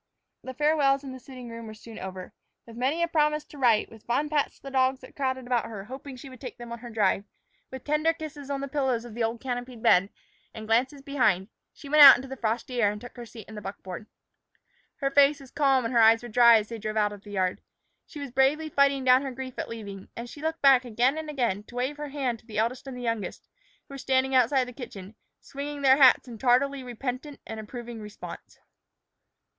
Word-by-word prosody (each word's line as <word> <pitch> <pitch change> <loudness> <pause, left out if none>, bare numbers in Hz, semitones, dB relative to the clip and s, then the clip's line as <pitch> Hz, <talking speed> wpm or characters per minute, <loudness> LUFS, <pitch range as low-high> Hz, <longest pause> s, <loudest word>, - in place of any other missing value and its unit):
The 260 0 -7
farewells 290 -1 +2
in 270 - -7
the 260 - -9
sitting 255 -1 -11
room 230 -1 -8
were 215 - -9
soon 225 +1 -11
over. 185 -1 -7 0.3
With 230 - -12
many 270 +8 0
a - - +2
promise 300 -2 +1
to 290 - -13
write, 235 -5 +3
with 225 -1 -14
fond 290 +6 0
pats 295 -2 0
to - - -26
the 275 - -7
dogs 260 0 +2
that - - -14
crowded 260 -2 -2
about 245 -1 0
her 205 -4 -7
hoping 265 +3 -8
she 255 +2 -11
would 255 -2 -13
take 255 - -8
them 240 -1 -9
on 235 - -6
her 240 +1 -9
drive, 205 -3 +1 0.4
with 260 -1 -8
tender 300 +2 +2
kisses 305 -3 -8
on 275 -1 -2
the 275 - -3
pillows 265 -4 -1
of 235 - -10
the 235 +1 -2
old 225 +1 -1
canopied 245 -2 -5
bed, 195 -4 +5 0.5
and 220 -1 -7
glances 255 +5 +1
behind, 220 -9 +1 0.2
she 285 - -13
went 300 +1 +5
out 285 - +12
into 255 +2 -6
the 265 - -6
frosty 240 +1 -2
air 205 -2 +4
and 210 - -7
took 245 +2 -11
her 240 -2 -9
seat 225 -3 -12
in 220 - -11
the 210 - -7
buckboard. 195 0 -8 0.9
Her 275 0 0
face 285 +1 +5
was 270 -2 -14
calm 270 -4 +2
and 230 - -2
her 235 - +4
eyes 225 +1 +6
were 240 - -7
dry 235 0 +7
as 210 -1 -3
they 230 -1 -6
drove 215 +1 -4
out 210 -1 +2
of 205 - -11
the 205 - -14
yard. 185 -2 -1 0.5
She 300 - -10
was 280 -3 -6
bravely 280 +5 +2
fighting 280 -2 +2
down 255 0 +5
her 275 -1 -4
grief 260 0 -7
at - - -4
leaving, 200 -4 -8
and 235 +1 -6
she 285 +5 -11
looked 320 0 -3
back 270 -2 +7
again 245 +3 +1
and 315 -1 -6
again 240 -9 -1
to 240 - -14
wave 260 +4 -2
her 295 0 -5
hand 265 -5 -2
to 225 - -25
the 215 - -7
eldest 235 +5 -1
and 260 -2 -6
the 250 - -7
youngest, 230 -3 -3 0.4
who - - -12
were 275 - -7
standing 265 0 +1
outside 255 +1 +3
the 250 - -9
kitchen, 210 -6 -9 0.3
swinging 285 +1 -6
their 265 0 +6
hats 265 -2 +6
in 230 -3 -9
tardily 265 +3 +2
repentant 255 +4 -5
and 225 - -7
approving 235 +1 -8
response. 210 -1 -10
250 Hz, 240 wpm, -27 LUFS, 225-275 Hz, 0.9 s, out